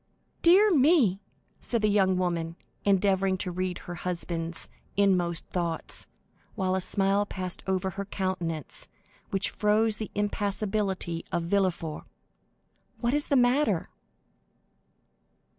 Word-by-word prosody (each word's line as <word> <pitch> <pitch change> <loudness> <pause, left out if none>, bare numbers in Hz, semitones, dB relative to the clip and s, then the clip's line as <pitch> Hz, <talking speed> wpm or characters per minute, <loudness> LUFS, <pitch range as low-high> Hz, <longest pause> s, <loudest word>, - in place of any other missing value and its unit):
"Dear 380 +4 +6
me!" 260 - +4 0.4
said 235 -3 -1
the - - +5
young 195 -3 +3
woman, 170 -2 -1 0.3
endeavoring 195 -1 +2
to 180 - -3
read 185 0 -2
her 175 - -5
husband's 170 -1 -3 0.3
inmost 180 -4 +2
thoughts, 170 -2 -3 0.5
while 185 -2 0
a 190 - +1
smile 195 +2 +2
passed 185 -3 -5
over 190 0 0
her 200 +2 -5
countenance 175 -6 -4 0.4
which 195 0 0
froze 215 0 +2
the 215 - -5
impassibility 205 -4 -1
of 170 - 0
Villefort; 175 -4 -1 0.9
"what 240 +1 0
is 295 0 +1
the 280 - +2
matter?" 255 +4 +2
190 Hz, 115 wpm, -28 LUFS, 180-210 Hz, 0.9 s, Dear